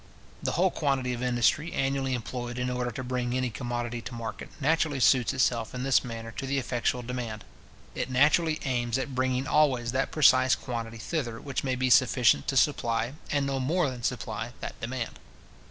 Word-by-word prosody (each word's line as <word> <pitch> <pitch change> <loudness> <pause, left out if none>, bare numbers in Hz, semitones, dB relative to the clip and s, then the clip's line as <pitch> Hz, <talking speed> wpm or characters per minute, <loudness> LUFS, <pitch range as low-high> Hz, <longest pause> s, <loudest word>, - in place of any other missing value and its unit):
The - - -1
whole 180 +2 +3
quantity 135 -4 0
of 120 - -5
industry 125 +6 +1
annually 135 -1 0
employed 120 +1 -5
in 125 0 -1
order 125 0 -1
to 130 +2 -6
bring 125 0 -1
any 130 -2 -1
commodity 120 +2 -3
to 115 +2 -7
market, 115 -1 -6
naturally 155 -1 +1
suits 125 +2 +4
itself 120 -2 0
in 125 - -3
this 135 -1 +3
manner 115 -2 -6
to 135 - -3
the 140 +1 0
effectual 125 -1 -1
demand. 120 -3 -5 0.5
It - - -3
naturally 155 +5 +3
aims 120 -2 0
at 135 0 -3
bringing 130 0 0
always 130 -6 +2
that 130 +2 0
precise 130 -3 +5
quantity 115 -2 -5
thither 120 -2 -3
which 135 -3 -4
may 130 -2 0
be 130 0 0
sufficient 120 - +4
to 135 - 0
supply, 120 -3 +1 0.2
and 145 -1 +1
no 135 -1 -1
more 150 +2 +1
than 125 -1 -8
supply, 115 -1 -3
that - - -7
demand. 120 0 -4
125 Hz, 185 wpm, -28 LUFS, 120-135 Hz, 0.5 s, precise